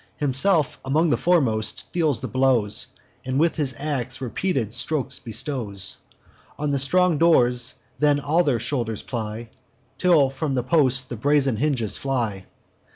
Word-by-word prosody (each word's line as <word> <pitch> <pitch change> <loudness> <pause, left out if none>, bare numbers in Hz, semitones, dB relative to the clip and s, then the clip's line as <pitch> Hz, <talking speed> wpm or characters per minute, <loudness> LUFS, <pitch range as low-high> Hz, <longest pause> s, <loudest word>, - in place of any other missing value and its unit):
Himself, 150 +1 +1
among 155 +4 +1
the - - +4
foremost, 120 -12 0
deals 155 -9 +1
his - - -5
blows, 130 -6 +2 0.4
And 130 +1 -2
with 165 +1 +1
his 135 -5 -1
ax 130 -4 -3
repeated 130 - -2
strokes 135 +1 -1
bestows 110 - -4 0.6
On 150 0 -2
the 140 - 0
strong 170 +3 +2
doors; 125 -7 +3 0.2
then 145 0 +3
all 150 +5 +1
their 140 -7 +1
shoulders 115 -2 -3
ply, 115 -1 -5 0.5
Till 155 -7 +4
from 135 0 -3
the 125 - 0
posts 130 -2 +3
the 125 -2 -8
brazen 140 -1 +2
hinges 125 -5 0
fly. 115 -8 -3
135 Hz, 145 wpm, -23 LUFS, 120-150 Hz, 0.6 s, the